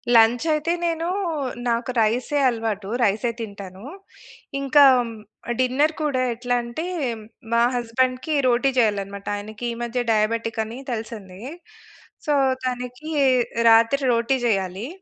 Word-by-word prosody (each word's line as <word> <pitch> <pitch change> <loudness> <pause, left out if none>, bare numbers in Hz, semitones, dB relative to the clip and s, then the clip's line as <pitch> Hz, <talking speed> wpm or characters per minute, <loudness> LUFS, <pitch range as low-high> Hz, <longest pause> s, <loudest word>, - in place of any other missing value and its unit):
Lunch 230 +5 +5
అయితే 305 +2 0
నేను 335 0 -1 0.6
నాకు 235 +2 -1
రై‌సే 240 +7 +1
అలవాటు. 220 -4 -3
రై‌సే 225 +3 +1
తింటాను. 200 -3 -8 0.8
ఇంకా 275 +1 +5 0.8
డిన్నర్ 265 +5 +2
కూడా 275 -4 0
ఎట్లా 245 +1 -2
అంటే 235 +8 -5 0.7
మా 235 - +4
హస్బెండ్‌కి 255 +5 0
రోటీ 245 +3 +3
చేయాలనమాట. 200 -3 0
ఆయనకి 215 +3 -7
ఈ - - -5
మధ్య 245 +1 -2
డయాబెటిక్ 225 +1 0
అని 225 +3 -8
తెలిసింది. 215 -5 -6 0.9
సో - - +2 0.3
తనకి 250 +4 -4 0.6
రాత్రి 230 +5 +4
రోటీ 235 +3 +1
చేయాలి. 195 +2 -1
235 Hz, 110 wpm, -23 LUFS, 215-255 Hz, 0.9 s, Lunch